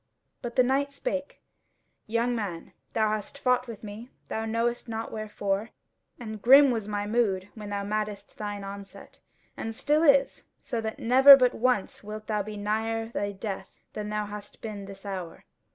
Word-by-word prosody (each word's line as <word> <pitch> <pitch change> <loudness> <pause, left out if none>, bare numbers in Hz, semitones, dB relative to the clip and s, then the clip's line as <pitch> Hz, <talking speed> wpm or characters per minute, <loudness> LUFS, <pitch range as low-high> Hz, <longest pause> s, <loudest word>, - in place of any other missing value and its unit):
But 240 -1 -5
the 255 - +6
knight 275 +3 +1
spake: 280 0 -4 0.6
"Young 235 +2 +1
man, 195 -7 -5 0.2
thou 220 -1 +2
hast 215 +5 -3
fought 250 -2 +2
with 225 -2 -8
me, 215 +4 -8 0.2
thou 220 0 -2
knowest 235 +2 -1
not 225 0 -4
wherefore, 210 0 -2 0.5
and 220 -3 -7
grim 270 +3 +8
was 225 -4 -2
my 205 -1 -2
mood 205 -4 +1
when 210 -2 -8
thou 200 -1 -2
madest 210 0 -4
thine 205 -1 -4
onset, 200 0 -10 0.4
and 225 0 -5
still 295 +6 +2
is, 280 -3 +4
so 240 -4 -3
that 220 0 -4
never 265 +4 +9
but 250 -2 +3
once 245 -5 0
wilt 215 +1 -7
thou 210 -1 0
be 210 +1 -6
nigher 225 +2 -1
thy 205 0 -1
death 195 -1 -6 0.2
than 210 0 -4
thou 210 0 -1
hast 205 0 -9
been 210 -3 -5
this 195 0 -11
hour. 185 -4 -6
215 Hz, 170 wpm, -28 LUFS, 205-240 Hz, 0.6 s, never